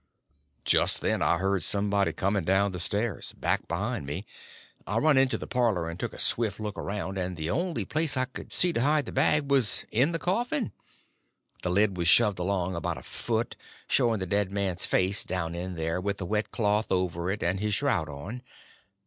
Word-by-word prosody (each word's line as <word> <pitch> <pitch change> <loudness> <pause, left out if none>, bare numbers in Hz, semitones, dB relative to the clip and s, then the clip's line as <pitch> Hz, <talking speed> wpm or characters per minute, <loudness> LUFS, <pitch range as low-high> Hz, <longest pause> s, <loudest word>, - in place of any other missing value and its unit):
Just - - +3
then - - 0
I 85 - +3
heard 95 -1 0
somebody 100 +1 +1
coming 100 0 -1
down 95 +3 +2
the 90 - -5
stairs, 105 +5 -2
back - - -1
behind 100 - -3
me. 90 +9 -5 0.6
I - - -1
run 155 -1 +4
in 135 0 +5
the 130 - -3
parlor 115 -10 0
and 85 +2 -6
took - - -4
a - - -11
swift 110 -4 0
look 105 -2 -4
around, 95 -1 -4
and 90 -1 -3
the 80 +1 -3
only 170 - -1
place 155 - +1
I 130 - +1 0.2
see 180 -1 +4
to 115 - 0
hide 145 +2 +2
the - - -7
bag 145 +1 +2
was 130 -6 +3
in 130 +8 +3
the 165 - 0
coffin. 235 - -1 0.9
The 90 - -2
lid 100 +1 +2
was 85 -1 0
shoved 105 0 +6
along 95 0 -1
about 85 - -3
a - - -10
foot, - - -2 0.3
showing 115 -2 +3
the 95 - -3
dead 100 +1 0
man's 95 -3 -1
face 95 +2 +2
down 85 -3 -3
in 90 +1 -5
there, 80 +2 -2
with 100 +1 -2
a 95 - -3
wet 105 +4 -1
cloth 105 0 0
over 90 -2 0
it, 100 +2 -2
and 90 +3 0
his 105 0 0
shroud 95 - 0
on. 85 - -7
100 Hz, 200 wpm, -27 LUFS, 90-120 Hz, 0.9 s, shoved